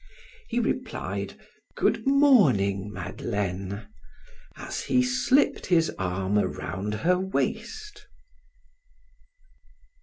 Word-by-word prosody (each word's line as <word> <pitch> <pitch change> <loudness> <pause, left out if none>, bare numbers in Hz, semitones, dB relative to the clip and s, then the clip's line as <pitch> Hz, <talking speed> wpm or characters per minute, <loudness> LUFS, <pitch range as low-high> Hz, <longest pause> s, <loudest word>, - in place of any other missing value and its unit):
He 240 - -1
replied: 240 - -3 0.4
"Good - - +1
morning, 130 - +4
Madeleine," 100 +2 -4 0.7
as - - -5
he 255 - +3
slipped 255 +2 +2
his 170 -3 +3
arm 95 +2 0
around 105 0 -3
her 180 +10 +2
waist. 420 - -3
160 Hz, 80 wpm, -26 LUFS, -, 0.7 s, morning